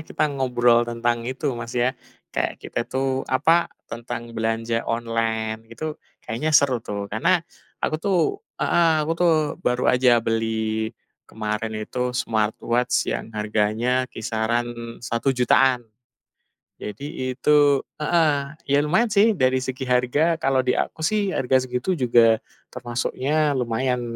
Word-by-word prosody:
kita 155 - -2
ngobrol 125 -3 +3
tentang 120 0 -1
itu, 130 +2 -2
Mas, 115 0 -6
ya, 125 +2 +2 0.4
kayak - - -1
kita - - -5
tuh, 135 0 -1
apa, 165 +6 +3 0.2
tentang 115 0 -6
belanja 115 +1 -1
online 115 -1 -2
itu 150 +7 -5 0.3
kayaknya 130 +8 -2
seru 130 -4 +2
tuh, 100 -2 -4
karena 170 - +2 0.4
aku - - 0
tuh 195 +1 +1 0.4
heeh, 170 -1 +3
aku 160 - -1
tuh 175 -1 +5 0.3
baru 125 0 +1
aja 125 -1 +4
beli 110 -1 -1 0.4
kemarin 110 0 -3
itu 125 +2 -2
smartwatch 115 +2 0
yang - - -4
harganya 110 +4 0
kisaran 115 +1 -1 0.4
Rp1.000.000-an. 125 +1 +2 1.0
Jadi 130 +5 -5
itu 145 0 +4 0.2
heeh, 160 +1 +3 0.4
ya 140 - +4
lumayan 220 +9 +2
sih, 215 +2 +4
dari 130 -3 +2
segi 130 +1 -4
harga 125 +7 +2
kalau 135 -4 +2
di 125 - +2
aku 160 - -3
sih 205 +2 +1
harga 130 0 +2
segitu 125 +9 -1
juga 115 -3 +4 0.3
termasuknya 130 +4 -1
lumayan 125 +1 0
125 Hz, 125 wpm, -23 LUFS, 115-140 Hz, 1.0 s, tuh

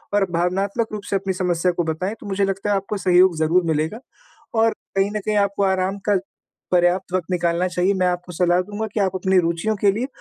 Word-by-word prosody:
और 205 -1 +3
भावनात्मक 195 +6 0
रूप 205 -1 -5
से - - 0
अपनी 195 -1 -1
समस्या 180 -1 0
को 175 0 -1
बताएँ, 170 +6 -2
तो - - -12
मुझे 195 0 +1
लगता 195 +1 -2
है 205 - +3
आपको 195 +2 -2
सहयोग 180 -2 +4
ज़रूर 165 +3 +2
मिलेगा 160 +7 -1 0.6
और 225 0 +4 0.3
कहीं 195 +1 +2
न - - -1
कहीं 210 +1 -1
आपको 200 0 +1
आराम 190 +1 0
का 200 -2 +4 0.5
पर्याप्त 180 +1 +2
वक़्त 185 -3 -1
निकालना 175 0 +1
चाहिए। 180 +2 +1
मैं, 185 -1 +1
आपको 180 0 -2
सलाह 175 +1 +2
दूँगा 210 +3 -5
कि 215 - 0
आप 190 -2 +1
अपनी 190 0 +1
रुचियों 170 +6 -1
के 200 0 +3
लिए 235 +5 -2
185 Hz, 220 wpm, -21 LUFS, 175-200 Hz, 0.6 s, सहयोग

